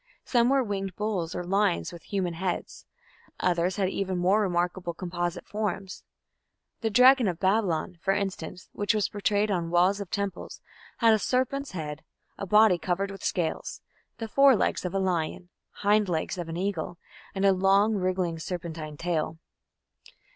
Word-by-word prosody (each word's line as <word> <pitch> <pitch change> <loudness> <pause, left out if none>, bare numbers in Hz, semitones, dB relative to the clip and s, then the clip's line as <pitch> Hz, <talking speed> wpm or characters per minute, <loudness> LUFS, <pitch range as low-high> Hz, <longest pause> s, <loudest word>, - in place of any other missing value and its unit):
Some 240 -1 +3
were 270 -1 +3
winged 195 -4 -3
bulls 200 -6 -2
or - - -3
lions 195 -1 +1
with 170 - -10
human 185 -4 -2
heads; 180 +1 -4 0.5
others 180 0 +1
had 195 -2 +1
even 190 -1 -2
more 190 +4 +3
remarkable 175 -2 -1
composite 175 0 -3
forms. 205 -2 -4 0.8
The 225 - -1
"dragon 250 +2 +6
of 175 -3 -1
Babylon", 190 -3 0
for 195 - +1
instance, 190 -3 -3
which 205 +1 0
was 210 - +1
portrayed 205 0 0
on 170 -3 -1
walls 180 +4 +3
of 195 - -6
temples, 200 -2 -4 0.4
had 230 -2 +5
a 215 - +3
serpent's 260 +3 -1
head, 150 -4 -5 0.3
a 200 - -6
body 210 -2 +5
covered 195 +3 -1
with 195 - -10
scales, 170 -4 -2 0.4
the 225 -1 -4
fore 275 +3 +6
legs 200 - 0
of 180 +1 -3
a - - +2
lion, 175 -2 -1 0.2
hind 205 -1 +1
legs 170 +2 -2
of 170 -1 -5
an 165 - -4
eagle, 180 -2 -3 0.4
and 195 +1 +1
a 195 - +6
long 195 +3 +3
wriggling 185 -4 -1
serpentine 160 -3 -6
tail. 165 -1 -2
190 Hz, 160 wpm, -27 LUFS, 175-205 Hz, 0.8 s, dragon